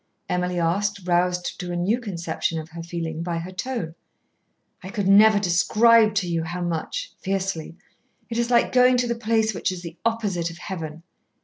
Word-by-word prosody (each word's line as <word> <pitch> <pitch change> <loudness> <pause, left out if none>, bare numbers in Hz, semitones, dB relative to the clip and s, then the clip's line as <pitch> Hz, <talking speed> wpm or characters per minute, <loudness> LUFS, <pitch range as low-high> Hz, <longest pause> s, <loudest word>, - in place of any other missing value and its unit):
Emily 180 0 -1
asked, 200 +4 0
roused 180 0 0
to 180 0 -4
a - - -2
new 190 +8 +1
conception 170 -5 -3
of 160 0 -8
her 165 +1 -8
feeling 165 -1 -4
by 170 0 -2
her 170 +3 -5
tone. 185 -4 -4 0.9
"I 190 - -8
could 205 -2 -2
never 210 +2 +7
describe 215 +4 +4
to 190 -3 +1
you 170 -1 0
how 175 +2 -5
much," 175 - -3
fiercely. 190 -4 -3 0.5
"It 230 0 -3
is 235 0 0
like 240 -1 +3
going 250 0 +5
to 245 0 +1
the 235 - 0
place 225 -1 +1
which 185 - -1
is 180 -1 -7
the 170 0 -9
opposite 205 -7 -1
of 165 - -10
Heaven." 165 -4 -6
180 Hz, 185 wpm, -24 LUFS, 170-220 Hz, 0.9 s, never